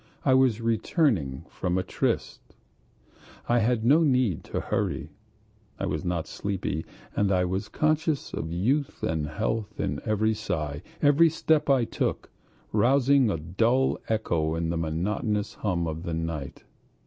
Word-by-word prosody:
I 135 - +5
was 130 -4 +3
returning 115 - +1
from 90 0 -2
a 95 - 0
tryst, - - -2 1.1
I 120 0 +3
had 115 0 +1
no 145 +7 +6
need 125 - +2
to - - -3
hurry; - - -2 0.7
I - - -2
was 75 0 -2
not 85 -3 -1
sleepy, 95 -5 -3 0.3
and 100 -1 +2
I 90 -1 +3
was 95 +3 -2
conscious 155 -1 0
of 80 - -4
youth 130 - 0
and 80 -2 -1
health 110 +6 -3
in - - -2
every 110 0 +1
sigh, 75 -9 -3 0.2
every 150 +3 +6
step 155 -1 +1
I 130 -4 +4
took, - - -2 0.4
rousing 130 +3 +4
a 100 - 0
dull 115 +12 +1
echo 85 -8 0
in 85 0 -1
the - - -1
monotonous 100 +6 -1
hum 90 -5 -1
of 80 0 -4
the 85 -1 -3
night. 80 -4 -4
105 Hz, 150 wpm, -27 LUFS, 85-130 Hz, 1.1 s, no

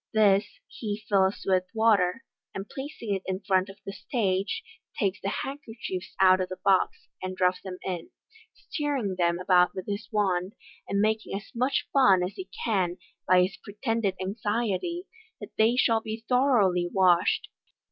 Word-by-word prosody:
This 205 -2 +4 0.2
he 215 -1 -5
fills 195 -1 +2
with 185 -1 +2
water, 220 -1 +3 0.3
and 195 +1 -5
placing 265 -6 -5
it 190 - -2
in 190 0 -2
front 190 -1 +1
of 195 - -11
the 195 - -5
stag*;, 195 -3 -1 0.5
takes 200 -1 0
the 195 - -1
handkerchiefs 225 -9 -5
out 185 -1 +6
of 185 - -2
the 185 - -6
box, 195 -2 +2
and 185 0 -4
drops 180 0 +2
them 185 -1 -7
in, 180 -3 -4 0.4
stirring 280 - -3
them 170 0 +2
about 180 0 +3
with 185 - -5
his 205 0 -4
wand 190 -3 0
j - - -44 0.3
and 200 0 +1
making 215 -1 0
as 205 - -11
much 255 +4 0
fun 195 -10 +5
as 180 +3 -3
he 375 - -8 0.2
can 185 -6 +1 0.3
by 180 0 +6
his 180 -1 -3
pretended 210 -2 -1
anxiety 215 - -2 0.3
that - - -9
they 225 +2 +5
shall 230 -3 +3
be 220 +1 -6
thoroughly 215 -10 +3
washed. 180 -3 +3
195 Hz, 165 wpm, -27 LUFS, 185-225 Hz, 0.5 s, out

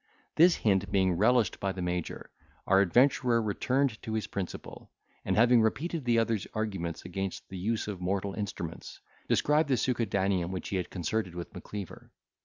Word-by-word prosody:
This 170 +2 +6
hint 95 -4 +1
being 95 -1 +3
relished 110 +5 +2
by 95 - -1
the 95 - -5
major, 90 -1 -4 0.3
our 95 +1 +5
adventurer 120 +4 +3
returned 120 +3 0
to 110 - -5
his 110 -1 -1
principal, 95 -3 -6 0.3
and - - 0
having 120 +1 +5
repeated 150 +7 -1
the 120 -1 +3
other's 115 -4 0
arguments 95 -7 -3
against 95 +1 -4
the 95 - -7
use 110 +4 -1
of 100 -4 -5
mortal 95 +2 -1
instruments, 100 -6 -6 0.3
described 150 +1 +3
the 130 - +3
succedaneum 100 -7 0
which 95 -1 -5
he 95 - -1
had 90 - -3
concerted 95 +1 -2
with 85 -1 -7
Macleaver. 100 -4 -8
100 Hz, 165 wpm, -29 LUFS, 95-115 Hz, 0.3 s, This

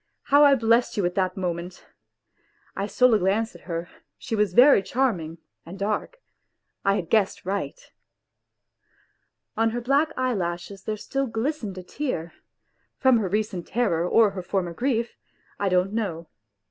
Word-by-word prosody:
How 285 +1 +5
I 285 -1 +7
blessed 230 -1 +2
you 200 - +1
at 175 - 0
that 185 -1 -1
moment! 180 0 -4 0.9
I 200 - -2
stole 250 +2 +4
a 215 - +4
glance 205 +5 0
at 175 -4 -16
her, 170 +1 -3 0.3
she 230 - -4
was 210 -4 0
very 260 -3 +7
charming 190 -8 -1 0.3
and 175 +4 -10
dark 210 - -2 0.7
I 195 0 +3
had 175 -4 -3
guessed 205 -2 +1
right. 200 - -3 1.8
On 225 0 +2
her 240 +2 -3
black 280 +6 +2
eyelashes 195 -6 -3
there 215 0 -2
still 275 +5 -2
glistened 225 -3 -3
a 185 - -7
tear 180 - -4 0.6
from 260 -2 +4
her 195 -4 -2
recent 205 -3 -2
terror 180 -8 0
or 220 -3 +5
her 190 -1 -5
former 175 -1 -2
grief 235 +2 -1 0.4
I 200 - +1
don't 185 +2 +1
know. 185 -7 -3
205 Hz, 155 wpm, -25 LUFS, 180-240 Hz, 1.8 s, I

